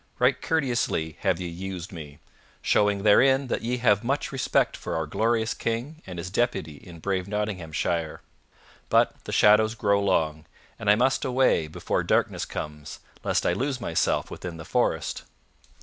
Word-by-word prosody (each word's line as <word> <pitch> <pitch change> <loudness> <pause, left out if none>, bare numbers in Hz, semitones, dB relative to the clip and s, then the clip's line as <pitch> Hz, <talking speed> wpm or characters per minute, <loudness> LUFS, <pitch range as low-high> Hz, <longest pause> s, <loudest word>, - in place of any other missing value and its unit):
Right - - +2
courteously 120 - 0
have - - +1
ye 90 - -4
used 90 +2 -6
me, 75 -5 -9 0.5
showing 105 -1 +2
therein 130 +6 +5
that - - -1
ye 125 +2 -1
have 105 -4 +3
much 135 +4 -1
respect 135 -1 +1
for - - -5
our 80 -1 -1
glorious 110 +7 0
King 125 +8 -3
and 90 -2 -7
his 90 +2 -5
deputy 95 - -1
in 85 +3 -12
brave 95 +2 -2
Nottinghamshire. 85 -6 -2 0.7
But - - +2
the - - -5
shadows 110 +2 +5
grow 100 -3 +2
long, 80 -5 0 0.3
and 110 - -1
I 105 - +7
must 130 +4 +2
away 130 -11 +2
before 85 +3 -2
darkness - - +1
comes, 75 -1 -7 0.2
lest - - 0
I - - +3
lose 130 +6 -2
myself 85 -8 0
within 90 -2 -6
the 80 - -9
forest." - - 0
100 Hz, 160 wpm, -26 LUFS, 85-120 Hz, 0.7 s, I